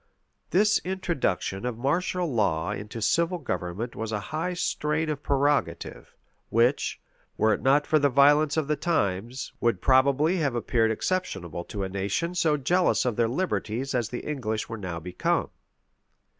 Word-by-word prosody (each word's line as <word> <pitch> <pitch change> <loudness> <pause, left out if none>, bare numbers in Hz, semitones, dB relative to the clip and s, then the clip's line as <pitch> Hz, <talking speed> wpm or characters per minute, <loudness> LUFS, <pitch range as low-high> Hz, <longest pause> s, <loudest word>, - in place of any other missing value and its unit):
This 210 +4 +4
introduction 170 - -2
of 125 -2 -3
martial 175 +8 0
law 85 -7 +1
into 105 +2 -5
civil 170 - +2
government 100 - -4
was 110 0 -4
a 105 - -1
high 170 +4 -1
strain 155 -2 -1
of 145 -1 -4
prerogative; 140 - -1 0.3
which, 120 +5 +2 0.4
were 110 0 +3
it - - -3
not 140 +2 +3
for 155 - +3
the 145 0 +3
violence 145 +3 +4
of 155 -3 0
the 150 - +1
times, 120 - -1
would 120 -1 +2
probably 140 +6 +3
have 140 -7 0
appeared 115 -1 +1
exceptionable 105 - -2
to 100 -3 -4
a - - -1
nation 100 - -2
so 160 -4 +2
jealous 175 +5 +2
of 120 -3 0
their 115 0 +2
liberties 135 - -2
as 120 -3 0
the 125 - -5
English 115 -8 -2
were 115 - -5
now 90 -4 -4
become. 90 +2 -1
130 Hz, 155 wpm, -26 LUFS, 110-155 Hz, 0.4 s, This